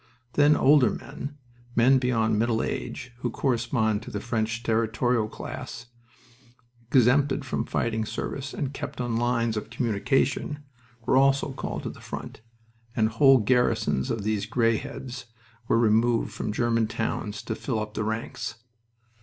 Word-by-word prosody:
Then 145 +1 +5
older 135 -4 +5
men, 145 +1 -7 0.4
men 130 +3 +5
beyond 115 -4 +1
middle 115 0 +1
age, 125 - -4
who 125 - -1
correspond 115 -4 0
to - - -9
the 105 - -4
French 115 +1 -2
Territorial 115 0 +1
class, 120 - -7 1.1
exempted 135 +2 +4
from 135 - -2
fighting 110 -1 -1
service 135 +5 -4
and 140 -2 -3
kept - - -6
on 120 -2 -1
lines 115 -1 +1
of 105 - -5
communication, 130 +5 0 0.4
were 130 - +3
also 135 +1 +3
called - - -4
to - - -4
the - - -14
front, - - -7 0.5
and 110 -1 +3
whole 135 +4 +6
garrisons 110 - +1
of 110 - -2
these 105 -1 -1
gray 115 -1 +2
heads 125 +2 -7 0.4
were - - +3
removed 115 +1 +2
from - - -3
German 115 0 +1
towns 105 -1 -3
to 110 - -3
fill 115 +1 -3
up 105 0 -5
the 110 - -2
ranks. 110 +2 -3
115 Hz, 145 wpm, -26 LUFS, 110-130 Hz, 1.1 s, whole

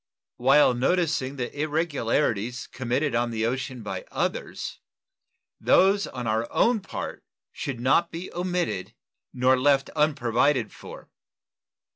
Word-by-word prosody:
While 135 +1 +5
noticing 140 0 0
the 125 -1 -4
irregularities 145 -7 0
committed 130 +4 -2
on 120 0 +1
the 110 -1 -1
ocean 125 0 -3
by 105 - -5
others, - - -3 0.8
those 200 +2 +4
on 125 -2 -6
our 110 +1 -1
own 235 -1 +3
part - - -6 0.3
should 130 -4 -5
not 150 +7 +3
be 170 +3 -7
omitted 175 - -2 0.4
nor 130 +1 +3
left 140 0 +3
unprovided 135 -5 +1
for. - - -12
135 Hz, 115 wpm, -26 LUFS, 120-155 Hz, 0.8 s, While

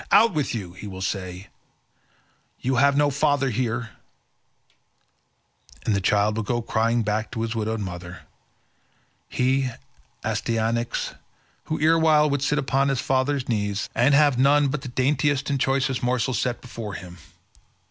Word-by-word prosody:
'Out 225 -1 +6
with 150 -6 -1
you,' 95 -6 -5
he 95 +3 -9
will 95 -1 -6
say, 95 0 -4 1.1
'you 130 0 0
have 140 +2 +4
no 145 0 +3
father 140 -1 +1
here,' 115 -1 -2 1.9
and 110 - +2
the 100 - 0
child 105 +2 +2
will 115 - -1
go 120 +3 -1
crying 115 0 +1
back 110 +1 -1
to 110 - -4
his 115 0 -2
widowed 110 0 -2
mother—he, 95 +8 -5 0.5
Astyanax, 115 +1 -1 0.5
who 155 - -3
erewhile 155 -1 +4
would 140 -1 0
sit 150 +1 +1
upon 135 -1 +1
his 135 -2 0
father's 130 +1 0
knees, 105 -3 -2
and 135 +4 +4
have 145 -3 +4
none 140 +1 +4
but 140 0 -3
the 135 - -7
daintiest 140 +2 +1
and 140 - 0
choicest 135 -1 0
morsels 125 -1 0
set 125 -2 -2
before 115 -5 -7
him. 90 -2 -10
125 Hz, 145 wpm, -24 LUFS, 110-140 Hz, 1.9 s, Out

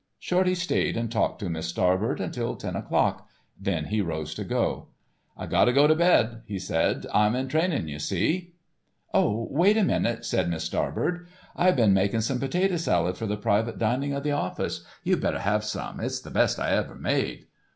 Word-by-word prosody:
Shorty 185 0 +1
stayed 180 -8 0
and 115 -1 -2
talked 115 - 0
to 100 - -3
Miss 80 0 -3
Starbird 95 +8 +1
until 120 -1 -3
ten - - -5
o'clock, - - 0 0.3
then 95 -5 -2
he 105 +4 0
rose 80 -4 -3
to - - -5
go. - - -1 0.5
"I - - -5
gotta 120 - +3
get 140 +3 +5
to 155 - +6
bed," 120 -10 +3
he 100 -2 -4
said, 90 -3 0
"I'm 105 +2 +3
in 130 +1 -1
training 155 - 0
you 75 -1 -6
see." 170 - -1 0.6
"Oh, 110 +2 +2
wait 185 +9 +4
a 220 - +4
minute," 120 -10 0
said 90 -2 0
Miss 80 -1 -2
Starbird, 175 - -2 0.3
"I 180 - +4
been 115 - +4
making 100 +4 +2
some 125 +3 -1
potato 180 +7 +1
salad 90 - +1
for 110 - -4
the 105 0 -2
private 110 +2 0
dining 130 +6 0
of 140 0 -3
the 150 - 0
office, 145 -11 -2 0.2
you - - +2
better - - -1
have 105 +2 +1
some; 105 - -5
it's - - -2
the - - -11
best - - +2
I - - 0
ever - - 0
made." - - -1
115 Hz, 195 wpm, -26 LUFS, 95-150 Hz, 0.6 s, to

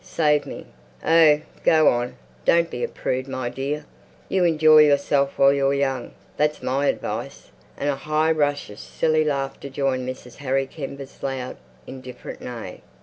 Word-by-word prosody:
Save 150 -3 +1
me!"... - - -8 0.4
"Oh, 160 -2 +5 0.2
go 155 -1 +5
on! 120 +1 -1 0.3
Don't 170 - +3
be 120 - -4
a - - +1
prude, 130 +1 -3
my 130 -2 -3
dear. 140 +4 -4 0.4
You 185 -2 +2
enjoy 155 -2 +6
yourself 140 -1 +3
while 140 0 +6
you're 140 0 +1
young. 135 -3 -2 0.2
That's 150 0 0
my 140 +2 0
advice." - - -4 0.3
And 145 - -2
a 145 - +1
high 155 +3 +1
rush 145 -6 0
of 105 - -11
silly 155 -1 +1
laughter 140 -2 -3
joined 130 -2 -1
Mrs. 125 -1 -9
Harry 135 -1 0
Kember's 140 -1 -9
loud, 130 -2 -4 0.3
indifferent 130 -1 -9
neigh. 115 -7 -7
140 Hz, 155 wpm, -23 LUFS, 130-150 Hz, 0.4 s, enjoy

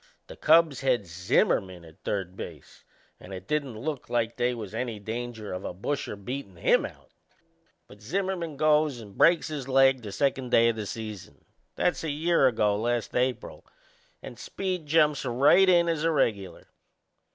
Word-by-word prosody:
The - - -11
Cubs 160 -3 +4
had 125 -6 +1
Zimmerman 90 +1 0
at 80 -1 -18
third 95 -3 -3
base - - -10 0.4
and 95 - -13
it 95 +1 -10
didn't 140 -6 -2
look 140 +3 -5
like 115 -1 -1
they 125 0 0
was 110 -3 -8
any 115 -1 -3
danger 110 0 -6
of 90 +1 -5
a - - -6
busher 120 +4 -3
beatin' 100 0 -7
him 85 - +2
out; - - -18 0.8
but 105 +1 -16
Zimmerman 175 - -3
goes 150 -3 +2
and 105 -3 -12
breaks 170 -1 +4
his 145 -4 -5
leg 135 -1 +4
the 105 -3 -7
second 130 +4 -1
day 115 -1 +5
o' - - +1
the 110 -2 -6
season 110 -4 -8 0.3
that's 175 - 0
a 160 - -2
year 155 -1 +2
ago 105 -4 +1
last 120 +1 -2
April 125 0 -2 0.6
and - - -10
Speed 185 -5 -4
jumps 150 -1 +3
right 140 +10 +4
in 170 -1 +4
as 165 -2 -1
a 165 - +3
regular. 100 - -1
125 Hz, 170 wpm, -27 LUFS, 105-150 Hz, 0.8 s, day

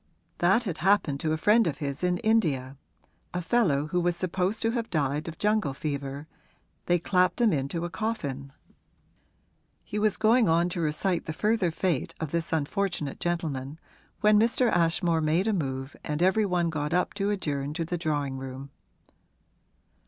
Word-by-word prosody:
That 190 +7 +4
had 180 -7 -4
happened 170 -6 +2
to 155 - -1
a 160 - +1
friend 210 +5 +4
of 145 -3 -2
his 140 +2 -4
in 180 0 +2
India 160 - +1 0.6
a - - 0
fellow 165 -9 +2
who 165 +4 -1
was 175 0 +1
supposed 185 +4 -1
to 225 - +2
have 230 -1 -3
died 150 -2 -1
of 165 -1 -6
jungle 210 -10 +1
fever 140 0 -4 0.6
they 175 - +4
clapped 180 +2 +1
him 230 -5 +4
into 145 +4 -2
a - - -4
coffin. 140 - -3 1.3
He 210 - -4
was 210 -1 +2
going 225 -1 +4
on 170 +2 +3
to 175 0 -3
recite 165 +4 -1
the 155 - -4
further 210 +1 +1
fate 165 -3 -1
of 160 -3 -4
this 170 0 -2
unfortunate 160 -1 -1
gentleman 155 -5 -2 0.4
when 210 -1 +5
Mr. 235 +2 +2
Ashmore 170 -1 +2
made 160 +6 +1
a 220 - +2
move 135 -6 -3
and 150 +3 -1
every 205 +3 +3
one 175 -2 +1
got 150 +1 -2
up 180 - +1
to 200 0 -1
adjourn 150 -7 -2
to 165 -1 -2
the 175 - -3
drawing 145 -5 -2
room. 135 +1 -8
170 Hz, 170 wpm, -27 LUFS, 145-200 Hz, 1.3 s, when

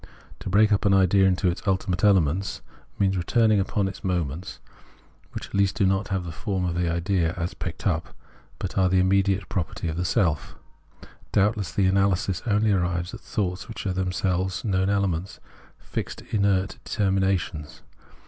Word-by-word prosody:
To - - -5
break 105 +3 +4
up 105 - +2
an 100 -1 +5
idea 95 0 +4
into 95 0 +1
its 85 - -1
ultimate 95 0 0
elements 95 -2 +2 0.4
means 95 -1 +2
returning 110 +4 +3
upon 100 +1 0
its 95 - -8
moments, 90 -2 -3 0.7
which - - -6
at - - -18
least 100 -1 +2
do 100 - +2
not 95 +2 +1
have 95 -2 -2
the 85 - -5
form 95 +1 -2
of 85 - -1
the 85 -1 0
idea 85 0 0
as 85 +1 -3
picked - - -6
up, - - -1 0.4
but - - -3
are 95 -1 +4
the 95 0 +3
imjnediate 95 +1 +2
property 90 -2 -3
of 80 - -4
the 90 - 0
self. 85 - 0 0.8
Doubt 105 +3 +3
less 100 -5 -4
this 100 - +1
analysis 95 -1 +1
only 105 0 +2
arrives 90 -2 0
at - - -7
thoughts 90 -1 -3
which 115 - -7
are 95 - 0
themselves 95 0 -1
known 95 -2 +1
elements, 95 -3 -1 0.4
fixed - - -6
inert 100 -2 +1
determinations. 95 -6 -1
95 Hz, 170 wpm, -25 LUFS, 90-100 Hz, 0.8 s, an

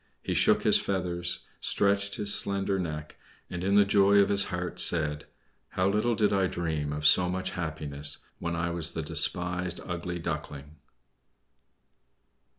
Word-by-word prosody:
He - - -2
shook - - +3
his - - +5
feathers, 90 -2 -3 0.2
stretched 100 0 +1
his 105 -3 +1
slender 100 0 +1
neck, 75 -4 -5 0.3
and 90 0 -4
in 100 +1 +1
the 100 0 +6
joy 100 0 +4
of 100 - +4
his 100 -1 +2
heart 90 -1 -4
said: 75 -3 +2 0.5
"How 95 0 +1
little 105 +4 +1
did 105 -1 +2
I 95 -1 +2
dream 80 -5 -3
of 75 +1 -4
so 90 +3 +5
much 95 +1 -3
happiness 75 -4 -4 0.2
when 85 0 -3
I 85 +1 -2
was 85 -1 -2
the 80 - -3
despised 90 +3 -1
Ugly 90 0 -4
Duckling!" 75 -2 -6
90 Hz, 155 wpm, -28 LUFS, 80-100 Hz, 0.5 s, the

